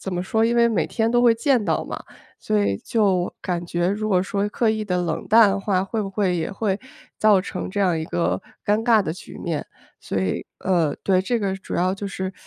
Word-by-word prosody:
怎 190 - -4
么 175 - -1
说， 220 +4 0
因 235 +1 +2
为 235 - +5
每 195 -8 0
天 225 -1 0
都 240 0 +3
会 235 -2 +5
见 250 -1 +2
到 - - 0
嘛。 - - -6 0.4
所 105 - 0
以 100 -1 0
就 195 -6 +1
感 175 -1 -2
觉 175 +1 0
如 215 +2 -1
果 180 -2 +3
说 200 +2 -1
刻 225 +2 0
意 220 -1 -2
地 180 -3 -1
冷 165 -2 -3
淡 220 0 +7
的 195 - -1
话， 195 -2 +1
会 220 +2 -3
不 195 - -4
会 195 -2 0
也 160 - -2
会 200 -1 -1 0.4
造 210 -3 +5
成 185 -1 -5
这 205 - -4
样 180 -4 +2
一 160 - -3
个 85 +2 -1 0.2
尴 210 +2 +2
尬 225 -4 +5
的 155 - -3
局 180 - -11
面， 165 -4 -3 0.3
所 95 - -3
以， 95 -1 -2
呃， 170 -5 +1
对， 185 -2 +3
这 235 +5 0
个 195 -3 -1
主 195 - -7
要 185 +2 +1
就 200 +1 -5
是 190 0 -4
195 Hz, 255 characters per minute, -23 LUFS, 175-215 Hz, 0.4 s, 淡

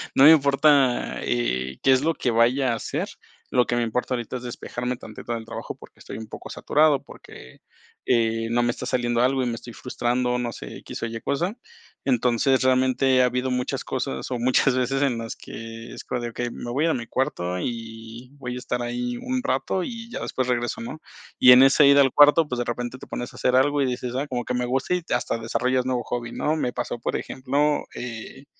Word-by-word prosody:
no 135 - +6
me 155 - +11
importa, 140 -3 +3
eh, 65 +2 -1
qué 135 - +5
es 130 0 +4
lo 165 +3 +1
que 125 - 0
vaya 120 +3 +3
a - - 0
hacer. 115 - -3 0.4
Lo 125 -1 +3
que 120 - -1
me 120 - +1
importa 120 +2 -1
ahorita 120 0 -3
es 120 - -10
despejarme 125 +1 -4
tantito 120 0 -7
del 115 - -4
trabajo 115 +1 -6
porque - - -16
estoy - - -8
un 110 - -8
poco - - -9
saturado 150 -2 +3
porque, 65 - -14 0.4
eh, 115 -2 +1
no 120 +1 +2
me 120 - +1
está 120 - -3
saliendo 120 -2 0
algo 130 +1 +2
y 125 - 0
me 115 - -2
estoy 120 0 -10
frustrando, 125 0 -1
no 120 -1 -2
sé, - - -8
x - - -8
o - - -1
y 115 0 -5
cosa. 175 - -2 0.5
Entonces, 125 +1 +2
realmente 130 0 +3
ha - - +5
habido 125 +1 -1
muchas 125 0 -2
cosas, 65 - -3
o 125 - 0
muchas 130 +2 +3
veces 130 +2 0
en 135 -4 +1
las 115 0 -5
que 115 0 -9
es - - -8
como 125 -1 -3
de: 120 - -3
"Okey, 120 +1 -4
me 120 - -7
voy 145 +6 +1
a 165 - +2
mi 115 -1 -4
cuarto 90 -10 -1
y 115 +1 -6
voy 125 -2 -5
a 125 - -4
estar 125 -1 -3
ahí 120 0 -3
un 255 - -2
rato 190 -8 0
y 230 +1 -7
ya - - -5
después 130 -1 -2
regreso", 120 -1 -1
¿no? 155 +7 -7 0.4
Y 125 - +9
en 125 +1 +9
ese 135 +1 +6
ir 140 0 +7
al 135 -2 +5
cuarto, 150 +2 +6
pues, 125 -2 -3
de 120 - -1
repente 120 +2 -4
te - - -11
pones 120 - -5
a - - -14
hacer 125 - +2
algo 145 +2 +3
y 135 - +2
dices: 125 0 -3
"Ay, 140 +3 -1
como 125 -3 -3
que - - -2
me 125 0 0
gusta", 130 +6 -1
y 180 - +1
hasta 120 -1 0
desarrollas 125 +3 0
nuevo 125 -2 0
hobby, 120 0 -4
¿no? 155 +5 0
Me 125 -6 -1
pasó, 120 -1 -4
por - - -2
ejemplo, 145 +3 0
eh, 125 +3 -7
125 Hz, 225 wpm, -24 LUFS, 120-135 Hz, 0.5 s, me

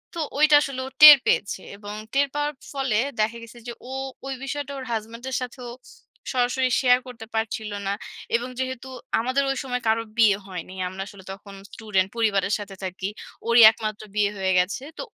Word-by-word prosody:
তো 335 - -4 0.2
ঐটা 305 -1 +6
আসলে 275 -3 -4
ও - - -7
টের 300 -1 +13
পেয়েছে। 200 -2 0 0.2
এবং 205 0 -8 0.2
টের 280 +1 +3
পাওয়ার 295 0 -1 0.2
ফলে 270 -6 0 0.2
দেখা 225 +2 +1
গেছে 230 +1 -13
যে 240 - -4 0.2
ও - - -7 0.3
ওই 270 - -3
বিষয়টা 280 +1 -4
ওর 265 - -6
হাসব্যান্ডের 230 +4 -4
সাথেও 250 -1 -7 0.6
সরাসরি 255 +1 +1
শেয়ার 250 -1 +5
করতে 235 -3 -9
পারছিল 220 -1 -2 0.2
না। 200 - +1 0.4
এবং 240 +2 -1
যেহেতু 260 0 -4 0.3
আমাদের 255 +4 +1
ঐ - - +2
সময় 250 -1 -3
কারো 225 +1 +2
বিয়ে 215 -4 +5
হয়নি। 185 0 -7
আমরা 190 +1 -7
আসলে 200 -1 -13
তখন 195 +1 -11 0.2
স্টুডেন্ট, 195 -4 0
পরিবারের 205 -3 +1
সাথে 200 -1 -8
থাকি। 185 +1 -4 0.4
ওরই 235 0 +6
একমাত্র 215 -1 -5
বিয়ে 205 -1 +2
হয়ে 190 -1 0
গেছে। 195 +8 -1
তো - - -4
230 Hz, 180 wpm, -24 LUFS, 205-260 Hz, 0.6 s, টের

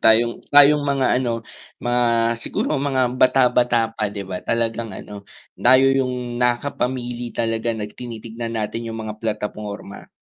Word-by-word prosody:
Tayong, 115 +1 +4
tayong 145 +1 +7
mga 135 -2 +2
ano 115 -2 -2 0.3
mga 120 0 0 0.4
siguro 145 -3 -2
mga 130 -3 +1
bata-bata 125 -3 +3
pa, 105 -2 -2
'di 100 -1 -6
ba, 95 -1 -5
talagan 115 +3 -1
ano 105 -1 -9 0.3
tayo 130 +2 +5
yung 125 -2 -2
nakakapamili 125 -1 -1
talaga, 115 0 -2 0.2
tinitignan 115 -1 -6
natin 115 +2 -3
'yung 115 - -5
mga 110 -1 -6
plataporma. 105 -2 -5
120 Hz, 130 wpm, -21 LUFS, 110-125 Hz, 0.4 s, tayong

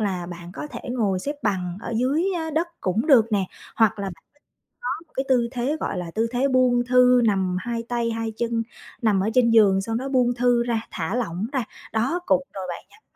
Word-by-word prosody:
là 185 -4 -1
bạn 175 0 -9
có 295 - -6
thể - - -7
ngồi 210 -7 0
xếp 285 +10 -4
bằng 180 -3 -1
ở 235 - -5
dưới 275 +8 +1
á 320 -1 -3
đất 325 +3 0
cũng 200 +8 0
được 235 -7 +5
nè 200 -2 +2 0.3
hoặc 220 -2 +3
là 200 - -3
bạn 180 -3 -8 0.6
có 485 - -3 0.2
một - - -36
cái 265 - -1
tư 245 -3 +3
thế 260 +4 -1
gọi - - -2
là 170 -2 -5
tư 225 +4 0
thế 255 +3 +1
buông 250 -2 +3
thư 250 0 +5
nằm 190 -4 +1
2 230 +2 -3
tay, 235 -1 0
2 225 -1 -3
chân, 230 -1 0 0.4
nằm 215 -4 +3
ở 195 +3 +1
trên 245 -2 +4
giường 205 -4 +5
sau 225 +3 -3
đó 265 +4 -2
buông 250 -2 +2
thư 245 -1 +3
ra, 235 -2 -1
thả 175 +5 -3
lỏng 210 -3 -2
ra. 260 -3 +1 0.3
Đó 245 +10 +1
cục - - +3
rồi 195 - -5
bạn 170 - -6
nhắm 430 - -21
230 Hz, 230 wpm, -24 LUFS, 195-250 Hz, 0.6 s, được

